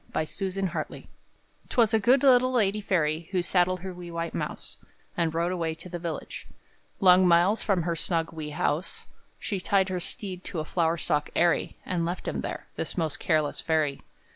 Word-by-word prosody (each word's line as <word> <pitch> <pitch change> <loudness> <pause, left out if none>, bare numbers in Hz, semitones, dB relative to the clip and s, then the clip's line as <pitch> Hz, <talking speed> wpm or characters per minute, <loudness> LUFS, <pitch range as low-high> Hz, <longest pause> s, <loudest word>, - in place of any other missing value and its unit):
By - - 0
Susan 195 +4 -3
Hartley 165 -4 -5 0.6
'Twas 230 -3 +3
a 220 - +5
good 250 +6 +4
little 255 -1 +6
lady 210 -4 +1
fairy, 165 -4 0
Who 185 -2 0
saddled 180 0 +2
her 190 0 -5
wee 175 -1 -9
white 170 0 -4
mouse, - - -5 0.4
And 165 -2 +1
rode 170 +2 0
away 165 -3 -2
to 170 +3 -11
the 175 0 -5
village, 165 -3 -6 0.5
Long 185 -1 +6
miles 175 +5 +4
from 190 -5 +1
her 170 0 -1
snug, 165 -1 -1
wee 155 -2 -5
house; 150 +3 -2 0.3
She 200 - -3
tied 190 +1 +2
her 185 -1 -2
steed 185 -1 -6
to 180 - -5
a 155 - -3
flower 165 0 +1
stalk 150 -2 0
airy, 175 0 +2
And 175 -2 -1
left 175 +2 -3
him - - -2
there - - -5
this - - -4
most 160 -4 -1
careless 155 -4 +1
fairy! 155 -4 0
175 Hz, 190 wpm, -27 LUFS, 165-190 Hz, 0.6 s, little